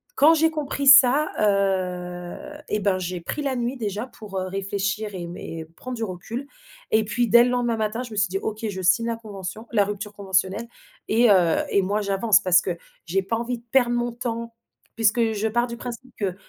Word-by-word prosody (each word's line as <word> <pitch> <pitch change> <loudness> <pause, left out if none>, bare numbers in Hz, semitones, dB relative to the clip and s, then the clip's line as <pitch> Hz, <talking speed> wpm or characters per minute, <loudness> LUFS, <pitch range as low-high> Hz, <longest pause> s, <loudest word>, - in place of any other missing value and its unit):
quand 315 - +6
j'ai 320 0 +3
compris 285 -2 -3
ça, 275 +2 +7
heu, 190 +5 -1
et 210 - 0
ben, 195 -2 +1
j'ai 180 -1 -4
pris 295 - -4
la 270 -2 -1
nuit 245 +2 -2
déjà 210 0 -3
pour, 205 -6 -7
heu, 185 - -3
réfléchir 200 +2 -3
et 180 - -5
m 170 +1 -7
et 160 -1 -7
prendre 255 0 -6
du 225 - -3
recul, 220 +7 -5 0.4
et 220 0 +4
puis, 235 +3 0
dès 235 +2 +8
le 245 - +1
lendemain 240 -2 0
matin, 220 +2 -1
je 245 - -9
me - - -7
suis 205 - +3
dit: 195 - -2
«OK, 220 +1 -4
je 190 -2 -5
signe 195 +6 +3
la 230 -1 -2
convention 210 0 -8
la 205 -4 +3
rupture 205 0 -5
conventionnelle 195 +3 0 0.4
et 230 +1 +4
heu, 175 -4 +4
et 200 - +3
moi, 205 +3 0
j'avance 200 +1 +3
parce 180 -2 +5
que 180 - -3 0.3
j'ai 190 +3 0
pas 225 +4 -2
envie 240 +1 -3
de - - -25
perdre 245 -3 +4
mon 240 0 -1
temps». 235 -1 -5 0.4
Puisque 225 0 +2
je 215 +1 -1
pars 240 +2 +1
du 235 - -7
principe 245 +1 -8
que 190 -4 -2
215 Hz, 215 wpm, -24 LUFS, 195-240 Hz, 0.4 s, dès